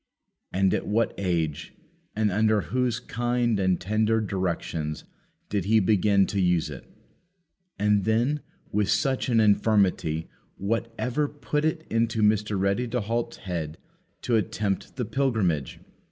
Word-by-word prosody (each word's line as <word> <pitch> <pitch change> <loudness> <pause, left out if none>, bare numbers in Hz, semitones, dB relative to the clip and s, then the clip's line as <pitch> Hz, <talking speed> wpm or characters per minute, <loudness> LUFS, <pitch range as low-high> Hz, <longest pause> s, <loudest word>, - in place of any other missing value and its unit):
And 95 0 +2
at - - -1
what 115 +3 +1
age, 85 -4 -2 0.4
and 105 -1 +1
under 110 +1 +3
whose 125 -2 -1
kind 120 -2 0
and 95 -2 +2
tender 110 +3 +1
directions 85 -6 -2 0.4
did 100 -3 -1
he 110 +2 +4
begin 100 -1 +3
to 100 -1 -1
use 90 -4 +1
it? 70 - -10 0.9
And, 105 0 +2
then, 120 +8 +1 0.3
with 105 -1 +1
such 130 +6 +1
an 115 -2 +4
infirmity, 100 -7 +2 0.3
what 115 +4 -1
ever 135 +4 0
put 150 +1 -2
it 160 0 -1
into 115 -1 +1
Mr. 105 -1 +2
Ready 100 +6 +1
to 120 +1 -1
halt's 115 +2 -2
head 80 -4 -3 0.5
to 120 -2 +2
attempt 100 -1 -2
the 125 -2 -2
pilgrimage? 105 - 0
105 Hz, 140 wpm, -26 LUFS, 95-115 Hz, 0.9 s, he